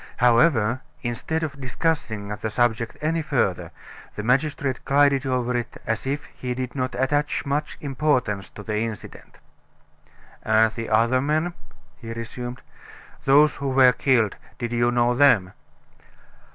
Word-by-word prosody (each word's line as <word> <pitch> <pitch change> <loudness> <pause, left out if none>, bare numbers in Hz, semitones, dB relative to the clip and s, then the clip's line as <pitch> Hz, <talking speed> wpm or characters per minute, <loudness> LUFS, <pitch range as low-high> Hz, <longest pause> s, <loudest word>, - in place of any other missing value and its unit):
However, 120 -1 +3 0.2
instead 130 +7 -2
of 140 -3 -5
discussing 130 -6 -2
the 105 +1 -4
subject 115 0 0
any 160 +2 0
further, 130 - -1 0.5
the 105 - -4
magistrate 135 +1 0
glided 140 -1 +3
over 125 -1 0
it 120 -1 -4
as 110 +3 -2
if 145 +2 -2
he 125 -1 -4
did 130 -1 -4
not 130 -2 -3
attach 145 +4 0
much 145 +2 -2
importance 130 - 0
to 105 - -11
the 105 0 -2
incident. 115 -2 -7 1.0
"And 110 0 +3
the 115 -1 -5
other 115 +4 +3
men," 155 +5 0 0.4
he 115 -2 -7
resumed, 120 +2 -7 0.6
"those 145 +2 +5
who 140 0 -2
were 130 -1 +6
killed: 120 -7 +2 0.2
did 120 -1 -4
you 120 0 +2
know 120 0 +2
them?" 120 -9 +4
125 Hz, 140 wpm, -24 LUFS, 115-140 Hz, 1.0 s, were